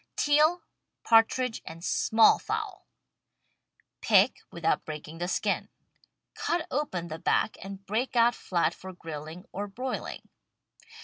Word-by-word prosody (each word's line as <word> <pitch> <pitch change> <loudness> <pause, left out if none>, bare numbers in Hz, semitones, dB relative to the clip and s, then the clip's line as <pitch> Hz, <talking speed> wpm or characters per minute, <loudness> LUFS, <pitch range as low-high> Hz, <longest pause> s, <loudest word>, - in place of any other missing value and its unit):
TEAL, 305 +4 +3 0.4
PARTRIDGE 230 +1 +3
AND 165 +1 -10
SMALL 220 0 +4
FOWL 430 -3 -4 1.1
Pick, 210 +1 +4
without 170 -1 0
breaking 155 +1 -8
the 175 - -2
skin. 185 - -1 0.6
Cut 340 -1 -1
open 190 - -2
the 160 +1 -6
back - - +1
and 195 0 -9
break 230 +6 -2
out 235 0 +5
flat 175 -7 0
for 190 0 -10
grilling 160 +1 -8
or 205 +2 -4
broiling. 250 +6 -5
205 Hz, 120 wpm, -28 LUFS, 170-260 Hz, 1.1 s, out